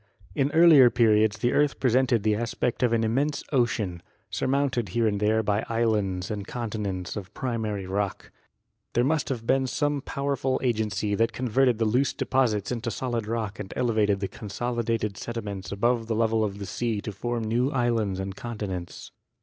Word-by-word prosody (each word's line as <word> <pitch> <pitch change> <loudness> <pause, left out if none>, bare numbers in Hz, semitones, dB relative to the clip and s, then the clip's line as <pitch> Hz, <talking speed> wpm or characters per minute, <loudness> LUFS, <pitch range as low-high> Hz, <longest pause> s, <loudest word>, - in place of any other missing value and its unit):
In 140 -1 +1
earlier 160 -6 +8
periods 110 -3 +3
the 120 +3 +1
earth 145 -1 +2
presented 125 -3 +2
the 110 0 +3
aspect 120 +2 -2
of 125 -2 +3
an 115 -1 +2
immense 140 +6 0
ocean, 115 - 0 0.3
surmounted 130 -5 0
here 115 +5 +1
and 105 -2 +1
there 110 +2 +2
by 105 0 0
islands 105 -6 0
and 100 -1 -4
continents 105 -6 -4
of 100 -3 -6
primary 110 -6 -2
rock. 100 +1 -3 0.6
There 120 - +3
must 150 +4 +1
have 120 -4 -3
been 130 +2 +2
some 145 +1 0
powerful 140 -1 -1
agency 105 -4 0
that 115 +3 +1
converted 125 0 +2
the 115 - +1
loose 125 +5 +2
deposits 115 -6 0
into 120 -1 -2
solid 120 -2 -3
rock 110 -2 -3
and 95 -2 -6
elevated 105 -4 +1
the 100 - -1
consolidated 115 0 -3
sediments 105 -5 -5
above 115 +3 +1
the 115 - -1
level 110 0 +2
of 100 -2 -2
the 100 - -6
sea 110 +3 -2
to 105 - -5
form 115 +3 -3
new 120 +4 +1
islands 115 -8 0
and 95 0 -4
continents. 100 -7 -6
115 Hz, 170 wpm, -26 LUFS, 105-125 Hz, 0.6 s, earlier